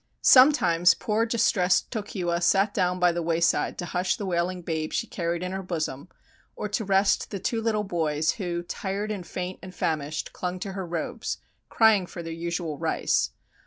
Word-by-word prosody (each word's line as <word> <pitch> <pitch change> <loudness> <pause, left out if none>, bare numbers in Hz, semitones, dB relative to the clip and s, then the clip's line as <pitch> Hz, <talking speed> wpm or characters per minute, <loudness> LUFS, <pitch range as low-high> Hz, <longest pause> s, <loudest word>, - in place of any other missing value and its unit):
Sometimes 185 - +6
poor 220 +2 0
distressed 205 -5 +2
Tokiwa 185 -6 -2
sat 195 +4 +3
down 180 0 0
by 180 -1 +4
the 170 0 -2
wayside 170 0 +1
to 175 - -4
hush 180 +1 0
the 210 - -5
wailing 180 0 -1
babe 160 -2 -3
she - - 0
carried 170 0 -3
in 180 - -3
her 190 0 -3
bosom, 165 -4 -4 0.5
or - - -3
to 215 +2 -1
rest 195 0 +2
the 200 - -4
two 225 +4 -2
little 220 -2 0
boys, 155 -5 0
who, 175 -2 -2
tired 200 +4 -3
and 190 -5 -5
faint 180 +1 -5
and 185 -1 -10
famished, 155 -1 -2
clung 180 0 -4
to 200 - -4
her 190 -2 -5
robes, 170 -1 -3 0.3
crying 215 -5 +4
for 175 - -8
their 165 0 -5
usual 165 -2 -3
rice. - - +1
180 Hz, 180 wpm, -26 LUFS, 170-200 Hz, 0.5 s, Sometimes